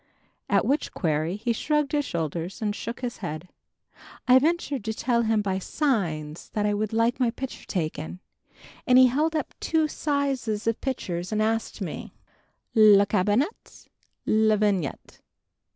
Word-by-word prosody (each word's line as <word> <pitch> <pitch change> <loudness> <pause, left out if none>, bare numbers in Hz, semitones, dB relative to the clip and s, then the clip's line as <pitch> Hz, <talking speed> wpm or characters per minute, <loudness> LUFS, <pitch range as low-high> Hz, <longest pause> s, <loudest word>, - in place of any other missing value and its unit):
at - - +3
which 285 +3 0
query 160 0 0
he 230 +3 -1
shrugged 300 +4 0
his 295 -1 +1
shoulders 170 - -4
and 210 -2 -1
shook 235 +2 -6
his 245 -2 -4
head! 175 -2 -6 0.8
I 255 +1 +7
ventured 295 -4 0
to 220 0 -2
tell 235 0 +1
him 220 -2 +1
by 190 -1 -1
signs 175 - -2
that 210 -1 0
I 205 - +2
would 210 0 -1
like 230 +2 +1
my 250 -2 +3
picture 260 +3 -7
taken 160 -1 -3 0.7
and 250 - +6
he 255 - +9
held 300 +6 +1
up 310 - -2
two 315 -1 +1
sizes 275 -8 -1
of 230 0 0
pictures 180 -9 -3
and 215 - 0
asked 225 +1 -1
me - - -6 0.6
"Le 210 -3 +7
cabinet, 210 - -1 0.4
le 215 0 +3
vignette?" 200 -8 -1
220 Hz, 150 wpm, -26 LUFS, 190-260 Hz, 0.8 s, he